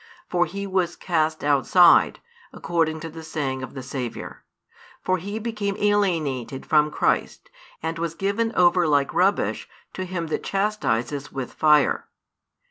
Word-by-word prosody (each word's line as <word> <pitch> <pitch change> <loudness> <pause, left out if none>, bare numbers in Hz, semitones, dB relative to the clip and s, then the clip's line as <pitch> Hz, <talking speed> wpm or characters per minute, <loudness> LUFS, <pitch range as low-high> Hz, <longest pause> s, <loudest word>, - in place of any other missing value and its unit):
For 175 0 +1
he 200 +4 -5
was 185 -3 -1
cast 160 -3 -1
outside, 150 +5 +5 0.3
according 160 -3 -1
to 165 - -6
the 165 +1 -9
saying 140 -5 -3
of 130 0 -8
the 130 - -6
Saviour. 125 -2 -6 0.6
For 185 -1 +1
he 200 +5 -5
became 210 -3 -3
alienated 165 - 0
from 150 -1 +3
Christ, - - -1 0.3
and 165 +1 -3
was 165 -1 -3
given 200 +5 -1
over 175 -1 +4
like 145 -2 +2
rubbish 185 +5 +1 0.2
to 185 - -4
him 180 -2 -4
that - - -2
chastises 150 - -1
with 135 -2 -5
fire. 150 -2 +3
165 Hz, 140 wpm, -24 LUFS, 145-190 Hz, 0.6 s, outside